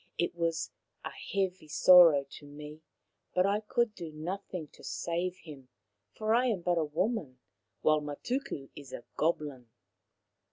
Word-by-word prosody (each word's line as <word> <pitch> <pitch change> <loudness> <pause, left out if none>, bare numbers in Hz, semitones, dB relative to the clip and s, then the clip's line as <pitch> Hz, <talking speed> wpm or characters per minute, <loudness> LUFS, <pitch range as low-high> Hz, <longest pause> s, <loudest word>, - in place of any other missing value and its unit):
It 175 - 0
was 165 -1 -1 0.3
a - - -4
heavy 190 -4 -3
sorrow 165 -3 +7
to 145 +1 -12
me, 150 +1 -10 0.5
but 180 0 +4
I 200 +1 +2
could 225 +1 0
do 170 -6 -7
nothing 170 +1 -5
to - - -18
save 175 +2 -2
him, 140 -5 -11 0.5
for 215 0 +1
I 245 +2 +4
am 210 -7 0
but 175 0 +1
a - - +2
woman, 160 - -1 0.4
while 155 0 +4
Matuku 150 - -4
is 140 -3 -11
a - - -6
goblin." 145 -7 -1
170 Hz, 150 wpm, -31 LUFS, 150-190 Hz, 0.5 s, sorrow